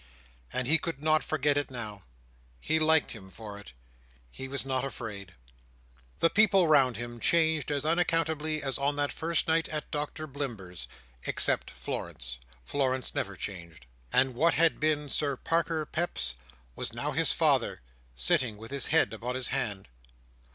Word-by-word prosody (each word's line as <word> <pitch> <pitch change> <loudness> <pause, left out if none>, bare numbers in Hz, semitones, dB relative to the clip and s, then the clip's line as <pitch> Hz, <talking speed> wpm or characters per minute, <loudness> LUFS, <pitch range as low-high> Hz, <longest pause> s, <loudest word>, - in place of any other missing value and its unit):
And 130 -1 -1
he 160 +3 +6
could 165 -4 -5
not 155 -2 +3
forget 145 -1 +1
it, 145 - 0
now. 110 -6 -6 0.6
He 160 +1 +1
liked 160 0 +4
him 95 -4 -8
for 105 0 -9
it. 105 - -11 0.6
He 135 - -7
was 135 0 +1
not 130 -1 0
afraid. 105 -8 -6 0.8
The 165 - +3
people 200 -4 +5
round 135 -5 +4
him 120 0 -6
changed 160 +1 +2
as 145 0 -1
unaccountably 160 -2 +1
as 135 0 -1
on 140 +1 +1
that 145 0 0
first 165 +1 0
night 160 0 +2
at 150 -1 -4
Doctor 150 +1 -3
Blimber's—except 90 - -3
Florence; - - -5 0.3
Florence 130 - 0
never 100 0 -2
changed—and 85 - -2
what 165 +7 +3
had 165 0 +3
been 150 -1 +1
Sir 140 -1 +1
Parker 165 0 0
Peps, 65 - -1 0.4
was - - -1
now - - -2
his - - +4
father, - - +2 0.3
sitting 105 - +2
with 115 +4 -10
his 140 -1 +1
head 160 -6 +3
upon 120 +3 -4
his 130 -1 +1
hand. 100 -3 -2
140 Hz, 150 wpm, -29 LUFS, 110-155 Hz, 0.8 s, he